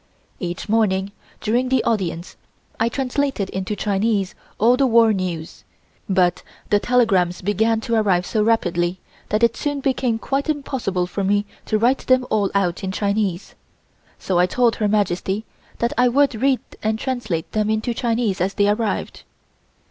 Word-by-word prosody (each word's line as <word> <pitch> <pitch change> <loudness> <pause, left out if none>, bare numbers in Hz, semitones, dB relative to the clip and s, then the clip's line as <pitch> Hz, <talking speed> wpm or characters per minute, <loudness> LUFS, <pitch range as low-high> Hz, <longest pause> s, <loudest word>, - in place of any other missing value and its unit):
Each 175 +2 -4
morning 200 -3 +1 0.3
during 245 +4 +1
the 260 -2 +2
audience 180 -6 -2 0.4
I 225 +1 +2
translated 265 -5 -1
into 190 +2 -3
Chinese 205 -1 0 0.2
all 235 +4 +4
the 270 +1 +2
war 230 -2 +5
news, 175 -4 -4 0.5
but 180 -2 +2 0.3
the 205 - +5
telegrams 200 -9 +2
began 220 +3 +1
to 230 - -3
arrive 195 -5 +2
so 215 - 0
rapidly 180 -5 +1 0.3
that 215 +2 0
it 230 0 +4
soon 290 -1 -2
became 260 -4 0
quite 275 +6 -2
impossible 260 -11 -1
for 195 +3 -4
me 205 +1 +1 0.2
to 215 - +2
write 245 +5 +2
them 255 0 +4
all 205 -3 +2
out 185 -3 0
in 190 - -2
Chinese, 200 -2 -1 0.6
so 185 -2 0
I 180 - +4
told 240 +3 +2
Her 210 - +1
Majesty 205 0 0 0.3
that 235 - 0
I 250 - +5
would 275 +2 +3
read 260 +3 +1 0.2
and 220 0 0
translate 220 -10 -3
them 215 -1 0
into 220 +2 0
Chinese 230 -5 -1
as 190 +2 0
they 205 -1 +3
arrived. 215 +1 -2
215 Hz, 160 wpm, -21 LUFS, 190-235 Hz, 0.6 s, war